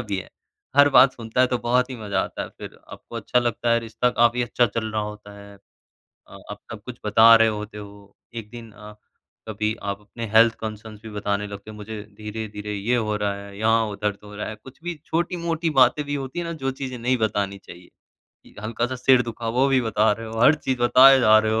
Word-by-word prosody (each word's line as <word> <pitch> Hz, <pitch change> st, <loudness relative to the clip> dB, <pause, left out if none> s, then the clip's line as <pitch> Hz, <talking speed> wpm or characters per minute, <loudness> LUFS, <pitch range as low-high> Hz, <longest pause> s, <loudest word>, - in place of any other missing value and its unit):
भी 105 Hz, -4 st, -3 dB
है। -, -, -8 dB, 0.5 s
हर 145 Hz, 0 st, +7 dB
बात 135 Hz, -1 st, +6 dB
सुनता 115 Hz, 0 st, -3 dB
है 130 Hz, -, +5 dB
तो 125 Hz, -1 st, -1 dB
बहुत 125 Hz, +2 st, +1 dB
ही 125 Hz, -, -6 dB
मज़ा 105 Hz, -3 st, -2 dB
आता -, -, -4 dB
है -, -, -7 dB
फिर। -, -, -10 dB
आपको -, -, -10 dB
अच्छा 125 Hz, -, 0 dB
लगता 120 Hz, -1 st, -1 dB
है 115 Hz, -, +4 dB
रिश्ता 115 Hz, +2 st, -1 dB
काफ़ी 120 Hz, 0 st, +2 dB
अच्छा 120 Hz, 0 st, +1 dB
चल 110 Hz, +1 st, -4 dB
रहा 105 Hz, -1 st, -1 dB
होता 105 Hz, -1 st, -8 dB
है। 100 Hz, 0 st, -13 dB, 0.7 s
अ, -, -, -13 dB
आप -, -, -8 dB
सब 110 Hz, -2 st, -8 dB
कुछ 125 Hz, 0 st, -9 dB
बता 110 Hz, +2 st, +7 dB
रहे 115 Hz, 0 st, +5 dB
होते 105 Hz, 0 st, -5 dB
हो। 100 Hz, -1 st, -12 dB, 0.2 s
एक 110 Hz, -2 st, -7 dB
दिन 115 Hz, -2 st, -11 dB
अ, 105 Hz, +1 st, -12 dB, 0.5 s
कभी 110 Hz, 0 st, -2 dB
आप 100 Hz, 0 st, -3 dB
अपने 115 Hz, +3 st, -8 dB
हेल्थ 115 Hz, 0 st, +6 dB
कंसर्न्स 110 Hz, -1 st, -7 dB
भी 110 Hz, -, -9 dB
बताने 105 Hz, 0 st, -2 dB
लगते 100 Hz, +1 st, -9 dB
हैं। 105 Hz, -, -12 dB
मुझे 105 Hz, 0 st, -7 dB, 0.2 s
धीरे-धीरे 105 Hz, -1 st, -6 dB
ये 105 Hz, +5 st, 0 dB
हो 105 Hz, -3 st, -1 dB
रहा 105 Hz, -1 st, -1 dB
है, 100 Hz, 0 st, -11 dB
यहाँ 110 Hz, +1 st, +2 dB
हो 105 Hz, -1 st, -5 dB
दर्द 105 Hz, 0 st, -2 dB
हो 105 Hz, 0 st, -12 dB
रहा 105 Hz, -, -5 dB
है। 110 Hz, -, -7 dB
कुछ 130 Hz, 0 st, -14 dB
भी 175 Hz, -1 st, -4 dB
छोटी-मोटी 170 Hz, -1 st, -1 dB
बातें 130 Hz, +4 st, +4 dB
भी 145 Hz, 0 st, -3 dB
होती 135 Hz, +4 st, -5 dB
है 170 Hz, -, -3 dB
ना 170 Hz, -, -4 dB
जो 135 Hz, -, +1 dB
चीज़ें 130 Hz, -1 st, -6 dB
नहीं 125 Hz, +2 st, +1 dB
बतानी 100 Hz, -3 st, -1 dB
चाहिए। 90 Hz, +1 st, -13 dB, 0.6 s
य -, -, -19 dB
हल्का-सा 120 Hz, +3 st, -2 dB
सिर 125 Hz, 0 st, +4 dB
दुखा 115 Hz, -1 st, -6 dB
वो 135 Hz, -, +4 dB
भी 135 Hz, -1 st, +3 dB
बता 110 Hz, -2 st, +2 dB
रहे 115 Hz, +2 st, -6 dB
हो 110 Hz, 0 st, -6 dB
हर 145 Hz, +5 st, +6 dB
चीज़ 130 Hz, -4 st, -3 dB
बताए 130 Hz, +2 st, +7 dB
जा 110 Hz, -2 st, +6 dB
रहे 110 Hz, 0 st, 0 dB
हो। 110 Hz, -, +1 dB
110 Hz, 235 wpm, -23 LUFS, 105-125 Hz, 0.7 s, हर